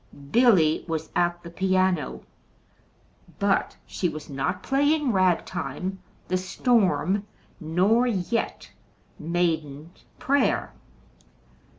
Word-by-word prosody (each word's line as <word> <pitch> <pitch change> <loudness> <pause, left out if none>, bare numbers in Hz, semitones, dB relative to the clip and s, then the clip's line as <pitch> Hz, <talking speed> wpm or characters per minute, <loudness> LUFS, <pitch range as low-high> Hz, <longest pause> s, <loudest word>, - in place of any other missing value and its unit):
Billy 195 -11 +4
was 160 -1 -4
at 175 0 0
the 170 - -9
piano, 185 -4 0 1.1
but - - 0
she 175 - -2
was 155 -2 -8
not 180 +7 -2
playing 285 0 +2
"rag 185 -4 +2
time," 190 +1 -5 0.3
"The 185 - 0
Storm," 195 0 +1 0.3
nor 190 +9 +2
yet 225 +1 -2 0.5
"The - - -10
Maiden's 165 -2 -2
Prayer." 280 +1 +1
185 Hz, 95 wpm, -25 LUFS, 165-210 Hz, 1.1 s, Billy